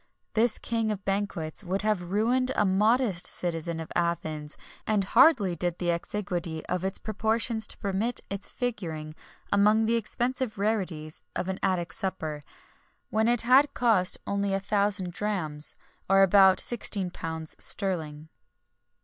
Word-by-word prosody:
This 225 0 +3
king 225 -1 -1
of 205 -2 -4
banquets 195 -4 -2
would 190 +2 -2
have 210 -3 +1
ruined 230 +8 0
a 210 - +2
modest 210 0 +2
citizen 170 -1 -1
of 160 - -8
Athens, 155 -3 -2 0.3
and 210 -2 +2
hardly 230 - +4
did 175 0 -1
the 175 -1 0
exiguity 170 -2 -4
of 180 0 -2
its 190 +1 -2
proportions 220 +1 -1
permit 205 +5 -2
its 200 0 -4
figuring 165 -11 -4 0.4
among 210 +2 +4
the 230 +1 +2
expensive 240 +1 -2
rarities 185 -7 -2
of 185 - -2
an 190 - -3
Attic 180 -3 -1
supper, 160 -6 -2 0.7
when 220 +1 +2
it 240 -1 +4
had 270 +4 +4
cost 220 -7 +3
only 200 -1 -1
a - - 0
thousand 200 -2 +1
drachms, 165 -8 -2 0.3
or 195 0 +6
about 190 0 +6
£16 180 -8 0
sterling. 160 -6 -1
195 Hz, 135 wpm, -27 LUFS, 175-220 Hz, 0.7 s, or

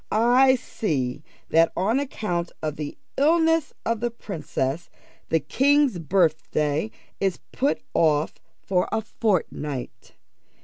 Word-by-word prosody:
I 250 +4 +5
see 145 - -2 0.3
that, 165 +1 +4
on 215 +8 +2
account 180 -11 -3
of 155 -1 -2
the 150 -1 -6 0.2
illness 325 +1 +3
of 230 -1 0
the 240 +1 0
princess, 170 - -4 0.4
the 165 - +3
king's 270 - +2
birthday 155 0 +1 0.3
is 190 -3 0
put 275 +3 0
off 155 -2 +2 0.3
for 180 -2 +1
a 220 - 0
fortnight. 155 - -2
190 Hz, 115 wpm, -24 LUFS, 155-245 Hz, 0.4 s, I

